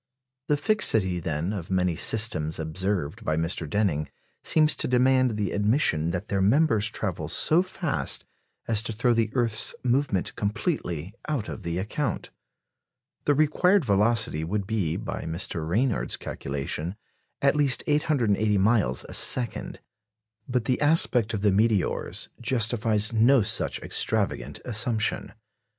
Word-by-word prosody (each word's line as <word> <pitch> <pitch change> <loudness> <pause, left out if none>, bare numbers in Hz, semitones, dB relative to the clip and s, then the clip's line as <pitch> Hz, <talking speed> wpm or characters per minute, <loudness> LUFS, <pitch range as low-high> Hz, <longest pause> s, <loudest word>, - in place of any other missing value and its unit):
The 150 - +2
fixity, 110 - +2
then, 80 +3 -3
of 90 -5 -6
many 90 -2 0
systems 90 -7 +2
observed 95 +4 -3
by 80 -7 -1
Mr. 80 -1 -1
Denning 80 -6 -1 0.3
seems 155 -1 +4
to - - 0
demand 130 -2 +2
the 100 -4 -2
admission 105 - +1
that 90 +4 -4
their 100 -1 -1
members 110 0 +3
travel - - -4
so 160 +3 +4
fast 185 -4 -3 0.4
as 110 -2 +1
to 115 - -4
throw 120 +3 +1
the 115 -2 0
earth's 115 -3 -1
movement 125 -6 0
completely 100 - -3
out 140 -8 -2
of - - -7
the 85 -2 -4
account. 110 +6 -3 0.9
The 145 - +3
required 155 +4 +2
velocity 105 -5 +1
would 100 +4 -3
be, 100 -7 -2
by - - -6
Mr. 80 -1 -3
Ranyard's 115 +6 0
calculation, 70 +6 -4 0.4
at 140 +1 +2
least 140 -4 +2
880 115 -9 +1
miles 95 - +1
a - - -10
second. 125 -2 +1 0.7
But 125 -2 -1
the 125 +2 -1
aspect 140 -7 +3
of 100 - -4
the 105 -1 +3
meteors 105 -2 0
justifies 115 -2 +1
no 115 +2 +4
such - - +1
extravagant 70 +3 -1
assumption. 115 -2 0
110 Hz, 135 wpm, -25 LUFS, 90-125 Hz, 0.9 s, seems